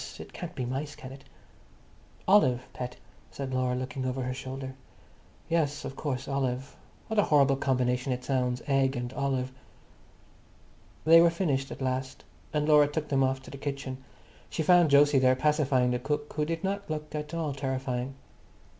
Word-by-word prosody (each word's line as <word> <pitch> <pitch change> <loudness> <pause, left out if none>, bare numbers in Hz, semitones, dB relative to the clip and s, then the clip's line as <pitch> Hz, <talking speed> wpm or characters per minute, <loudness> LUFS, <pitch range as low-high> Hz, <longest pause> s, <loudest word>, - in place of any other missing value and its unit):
It - - -10
can't - - -7
be 125 - -2
mice, 140 +4 -4
can 130 - -10
it?" 135 0 -12 1.0
"Olive, 130 -11 +4
pet," 125 0 -5 0.3
said 135 -2 -5
Laura, 130 -1 +1
looking 130 +1 -4
over 130 0 -2
her 125 0 -2
shoulder. 130 0 -6 0.7
"Yes, 155 -3 0
of 135 - -6
course, 135 -4 -3
olive. 135 -1 -2 0.3
What 220 -1 0
a - - +4
horrible 140 -2 +4
combination 125 -1 0
it 125 0 -2
sounds. 125 -1 0
Egg 135 -1 +2
and 125 +1 -4
olive." 135 -2 -1 1.5
They 165 +1 +8
were 170 - +6
finished 150 -6 -1
at - - -6
last, 130 0 -3 0.3
and 150 0 0
Laura 150 -1 +6
took 150 +1 -3
them 135 -1 +2
off 130 0 0
to - - -11
the 140 - -8
kitchen. 140 -2 -5 0.5
She 160 - -2
found 175 -2 +5
Jose 145 0 +6
there 130 0 +4
pacifying 135 -3 +2
the 125 - 0
cook, 150 +3 -3
who 150 0 0
did 165 +2 -3
not 200 0 -2
look 150 -1 -4
at 150 +1 -4
all 160 -4 -1
terrifying. 130 -1 -3
135 Hz, 170 wpm, -29 LUFS, 130-150 Hz, 1.5 s, They